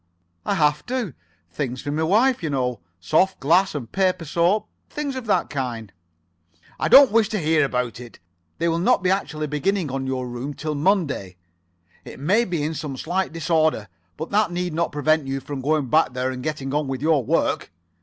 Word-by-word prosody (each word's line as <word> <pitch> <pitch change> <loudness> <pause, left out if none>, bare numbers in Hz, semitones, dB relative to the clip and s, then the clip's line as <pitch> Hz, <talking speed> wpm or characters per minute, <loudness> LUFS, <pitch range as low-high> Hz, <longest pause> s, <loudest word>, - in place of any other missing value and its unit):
"I - - +1
have 150 -1 +2
to. 245 - -2 0.4
Things 130 +2 -4
for 145 - -3
my 155 +2 -1
wife, 225 +10 +3
you 160 - -2
know. 125 -4 -1 0.2
Soft 185 - +2
glass 170 +6 +3
and 120 -6 -5
paper 185 -3 +1
soap. 175 +7 +1 0.2
Things 290 -2 -4
of 255 -3 -6
that 205 - +1
kind." 120 -7 -4 0.9
"I - - +1
don't 270 0 +8
wish 220 -1 +3
to 215 - -1
hear 160 -1 +2
about 125 -3 -2
it. 120 -2 -11 0.4
They 170 - 0
will 165 0 +1
not 195 +2 +2
be 185 - +3
actually 155 -6 -1
beginning 155 +2 -1
on 135 0 -3
your 130 -1 -2
room 125 +4 -5
till 155 0 -3
Monday. 145 - 0 0.7
It - - -11
may 200 +12 +2
be 170 -6 -2
in 155 +2 -1
some 145 -3 -5
slight 180 +7 -1
disorder, 160 - 0 0.3
but 160 - -6
that 205 -2 +2
need 175 -1 -2
not 170 +1 0
prevent 150 0 +1
you 135 0 -2
from 135 0 -6
going 150 +1 +1
back 155 +1 +2
there 130 +1 -1
and 130 -1 -6
getting 140 -1 -4
on 150 -1 0
with 135 0 -4
your 155 -4 +3
work. - - 0
155 Hz, 195 wpm, -23 LUFS, 135-185 Hz, 0.9 s, don't